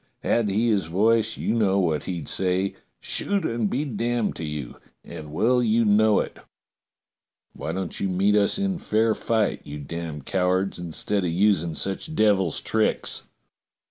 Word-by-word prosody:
Had 115 -3 +1
he 110 +4 +1
his 100 -6 +1
voice 110 +5 +2
you - - -1
know 100 -4 +2
what 80 -6 0
he'd 85 -6 -4
say 95 +1 0
— - - -48
'Shoot 200 -1 +1
and 115 -3 0
be 140 +8 -1
damned 120 -2 -1
to - - -5
you!' 75 -5 -5 0.3
and 75 -1 -9
well 120 +10 +2
you 115 0 +2
know 105 0 +4
it. - - -4 1.1
Why 80 - -5
don't 95 0 -3
you 100 - -1
meet 95 +3 +2
us 105 - +3
in 195 -2 -1
fair 110 -3 +2
fight, 110 -1 0
you 75 +1 -7
damned 75 0 -6
cow 90 -1 0
ards, 95 +1 0
instead 90 +4 -2
of 90 - 0
using 85 -2 +2
such 95 - -3
devil's 100 - +2
tricks - - -1
100 Hz, 170 wpm, -24 LUFS, 85-110 Hz, 1.1 s, know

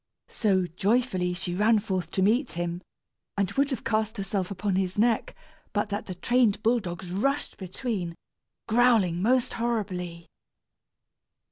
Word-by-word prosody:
So, 190 -5 +2
joyfully, 185 0 0
she 175 0 -3
ran 215 +4 +4
forth 190 -5 -2
to 190 - 0
meet 235 +8 +2
him, 175 +1 -3 0.6
and 200 -2 +1
would 280 0 +2
have 265 - -3
cast 220 0 0
herself 195 -1 -2
upon 200 0 -1
his 185 0 -1
neck, 225 +1 +2 0.4
but 205 0 0
that 205 +1 -3
the 185 - -5
trained 230 +1 +2
bull 235 +2 +4
dogs 175 -3 -6
rushed 275 +10 -1
between, 185 -2 -3 0.5
growling 220 -7 +4
most 250 +4 +2
horribly. 185 -8 -2
200 Hz, 140 wpm, -27 LUFS, 180-230 Hz, 0.6 s, ran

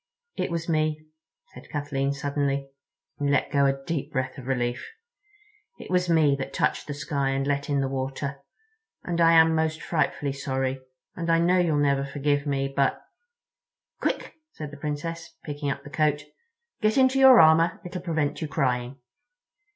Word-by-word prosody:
"It - - -2
was 170 -1 -3
me," 155 -1 0 0.5
said - - -13
Kathleen 140 -2 -1
suddenly, 140 -1 -2 0.5
and 145 -1 0
let 140 - +1
go 140 -1 +3
a 135 0 -1
deep 155 -3 -3
breath 130 -1 -3
of 130 - -10
relief. 120 -2 -1 0.9
"It - - -10
was 180 -1 +1
me 155 -4 +4
that 135 0 -5
touched - - 0
the 145 - -4
sky 140 -1 -1
and 135 0 -1
let 140 0 -1
in 140 -1 +1
the 135 - 0
water; 135 +1 -4 0.6
and 170 -1 -1
I 165 0 +6
am 160 0 +6
most 160 0 0
frightfully 145 -4 -1
sorry, 135 -1 -2 0.3
and 170 -1 -4
I 165 - +5
know 175 +2 +3
you'll 165 -4 +2
never 140 -1 +2
forgive 145 +1 -1
me. 135 -1 0
But—" 140 -1 +2 1.0
"Quick," - - -2 0.2
said 150 -2 -7
the 145 - -10
Princess, 160 +3 -5
picking 145 -1 -4
up 140 0 -4
the 145 - -11
coat, 150 -1 +1 0.6
"get 215 +2 +2
into 260 0 +4
your 265 -2 +9
armor; 165 +1 +5
it'll 180 0 -5
prevent 160 -4 -1
your 160 - -2
crying." 130 -3 -1
145 Hz, 170 wpm, -26 LUFS, 135-160 Hz, 1.0 s, your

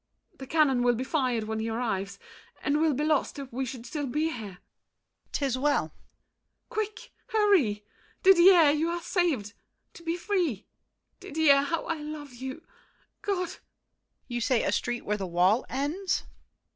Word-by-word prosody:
The 265 - -8
cannon 285 -5 +3
will 245 0 +3
be 250 - -2
fired 255 -6 0
when 220 0 -3
he 225 +1 -2
arrives, 200 -4 -2 0.5
And 295 +2 +1
we'll 315 -3 +3
be 295 - -1
lost 305 -2 +1
if 275 -3 -8
we 260 +1 -2
should 240 -1 -7
still 290 -1 -3
be 305 +6 0
here. 210 - -7
DIDIER. - - -30 0.7
'Tis 270 -3 0
well! 290 +1 +2
MARION. - - -39
Quick! 435 -3 -4 0.2
hurry! 355 - +2 0.4
Didier, 360 -4 +7
you 310 +3 0
are 345 0 -2
saved! 290 - 0 0.4
To - - -13
be 335 +1 -2
free! 345 - -1 0.5
Didier, 290 -2 +4
how 315 +4 -2
I 330 -2 -2
love 295 -2 -7
you—God! 330 +8 -6
DIDIER. - - -10 0.7
You 240 -1 -3
say 240 0 +2
a - - +1
street 240 0 -2
where 210 0 0
the 195 -2 -4
wall 180 +7 +2
ends? 320 +8 -1
280 Hz, 160 wpm, -28 LUFS, 240-330 Hz, 0.7 s, Didier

